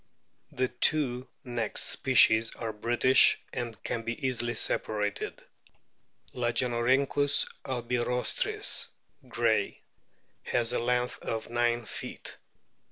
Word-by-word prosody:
The 130 +1 -1
two 130 -5 +3 0.2
next 120 -4 0
species 115 -4 +4
are 115 -2 -5
British, 120 +4 +4 0.2
and 120 -3 -6
can 115 - -3
be 115 +3 -5
easily 120 -2 -1
separated. 105 -1 -2 0.9
Lagenorhynchus 125 +3 +1 0.2
albirostris, 125 -1 -2 0.4
Gray,* - - 0 0.6
has 120 0 -1
a - - 0
length 125 +1 -1
of 115 +1 -5
9 120 0 0
feet. - - -6
120 Hz, 95 wpm, -28 LUFS, 115-125 Hz, 0.9 s, species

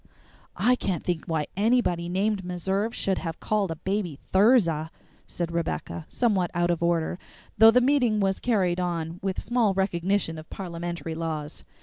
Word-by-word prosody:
"I 250 +4 +4
can't 190 -7 -2
think 175 -3 -2
why 160 -2 0
anybody 200 -5 +1
named 195 +2 0
Meserve 190 +5 -1
should 195 - 0
have 165 -2 -5
called 210 -3 0
a 165 - -3
baby 185 -1 -2 0.2
Thirza," 190 -7 +4 0.4
said 170 -1 -4
Rebecca, 85 - -3
somewhat 200 -8 +1
out 175 0 +2
of 170 - -2
order, 170 +1 0 0.4
though 225 +1 +10
the 250 +2 +5
meeting 250 -5 +3
was 195 -1 +1
carried 185 -7 +1
on 170 -1 -3
with 190 -1 -2
small 225 -3 +1
recognition 190 -2 0
of 155 - -12
parliamentary 170 -2 -5
laws. 160 -2 -4
180 Hz, 155 wpm, -26 LUFS, 170-205 Hz, 0.4 s, though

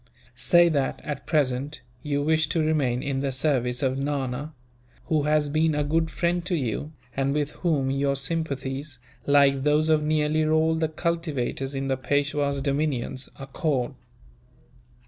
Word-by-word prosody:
Say 175 -1 +5
that, 140 -4 0
at 145 -2 -5
present, 145 -2 0 0.2
you 145 -1 -1
wish 155 0 +2
to 165 - 0
remain 135 -6 +1
in 140 -2 -1
the 135 0 -1
service 130 -2 0
of 130 0 0
Nana; 140 0 -2 0.6
who 155 -2 +3
has 150 -1 +2
been 155 +1 +1
a 150 - +1
good 160 +2 +1
friend 175 +1 0
to 180 - +1
you, 140 +1 -2 0.2
and 140 +1 0
with 150 0 0
whom 145 -7 +1
your 140 0 +1
sympathies, 140 -2 -3 0.3
like 140 -1 +5
those 150 +2 +2
of 155 -1 +4
nearly 155 0 +1
all 160 +1 +3
the 160 -1 0
cultivators 155 -5 -2
in 135 0 -2
the 135 -1 0
Peishwa's 140 +1 0
dominions, 140 -2 -1
accord. 135 -1 -2
145 Hz, 150 wpm, -25 LUFS, 135-155 Hz, 0.6 s, Say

